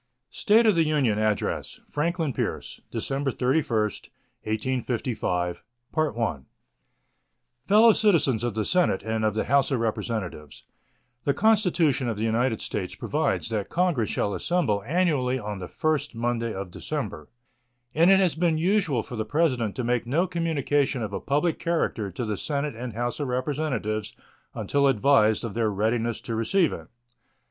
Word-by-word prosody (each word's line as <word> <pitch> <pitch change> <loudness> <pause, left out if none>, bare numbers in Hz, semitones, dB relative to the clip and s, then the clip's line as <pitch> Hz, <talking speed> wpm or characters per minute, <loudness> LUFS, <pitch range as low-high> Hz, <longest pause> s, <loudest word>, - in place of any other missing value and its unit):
State 225 +1 +3
of 215 - +5
the 165 -2 +3
Union 140 -9 +1
Address 110 -1 -1
Franklin 160 -1 -1
Pierce - - -4
December 135 0 -2
31, 125 -3 +1 0.6
1855 110 -6 -2 2.1
Fellow 220 +3 +7
Citizens 155 - +2
of 120 -3 -2
the 110 -1 -1
Senate 180 - +2
and 110 0 -2
of 110 -1 +1
the 110 - 0
House 140 +1 +2
of 135 -4 0
Representatives: 110 -9 -4 0.6
The 140 - +1
Constitution 180 - +2
of 110 - -3
the 110 - -2
United 115 +1 +1
States - - -4
provides - - -1
that 105 -3 -2
Congress 170 - +1
shall 100 - -1
assemble 135 - 0
annually 150 -7 +1
on 105 -4 -5
the 90 - -6
first 155 - -1
Monday 115 0 -1
of 95 -3 -6
December, 75 -3 -5 0.6
and 165 +4 +4
it 195 0 +6
has 185 -4 +3
been 165 -1 +1
usual 165 - +1
for 125 - -8
the 110 - -1
President 130 -6 0
to 125 - -2
make 120 0 0
no 160 +9 +2
communication 145 -7 0
of 100 -2 -5
a - - -2
public 150 +4 0
character 160 -11 -1
to 95 +6 -4
the 105 -2 -2
Senate 145 -3 -2
and 120 0 -6
House 120 +4 -3
of 145 - -2
Representatives 125 -5 -2 0.4
until 140 -1 +1
advised 120 -3 +3
of 110 - -5
their 115 -1 +1
readiness 110 +3 -1
to 115 - -5
receive 135 - +2
it. - - -8
125 Hz, 155 wpm, -26 LUFS, 110-155 Hz, 2.1 s, Fellow